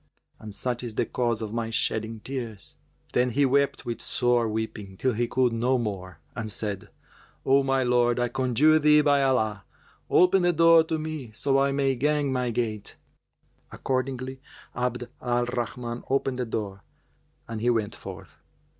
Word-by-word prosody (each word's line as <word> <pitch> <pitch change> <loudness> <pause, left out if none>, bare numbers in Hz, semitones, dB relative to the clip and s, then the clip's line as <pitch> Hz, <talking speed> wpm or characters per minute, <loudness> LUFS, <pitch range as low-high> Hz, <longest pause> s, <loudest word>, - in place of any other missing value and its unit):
And 105 -2 -9
such 125 +1 -2
is 115 -3 -5
the - - +1
cause 120 -3 -1
of 110 0 -5
my 115 -1 -2
shedding 110 0 -1
tears!" 120 -6 -6 0.4
Then 125 +1 +3
he 140 +4 +2
wept 140 +1 +1
with 120 -1 -4
sore 120 -2 +1
weeping 105 -3 -5
till 130 +3 +1
he 120 +2 0
could 125 -1 +1
no 125 +3 +1
more 95 -7 -4 0.2
and 110 -3 -4
said, 100 -2 -5 0.6
"O 135 +1 +5
my 135 -1 +1
lord, 120 -1 +2
I 120 - +2
conjure 135 +5 +3
thee 150 0 +5
by 145 -1 +3
Allah, 110 -7 +1 0.5
open 180 +1 +5
the 175 0 +3
door 165 0 +6
to 160 0 -1
me, 155 -5 -5
so 135 +4 +1
I 140 0 +2
may 135 -1 +1
gang 145 +1 +1
my 125 -1 0
gait!" 110 -3 -3 0.8
Accordingly 130 0 -3 0.3
Abd 125 0 -2
al 120 0 +1
Rahman 120 -1 -4
opened 135 -1 0
the 125 - -2
door 100 -3 -4 0.7
and 115 -2 -5
he 120 - +2
went 110 -4 0
forth. - - -10
125 Hz, 165 wpm, -26 LUFS, 115-135 Hz, 0.8 s, door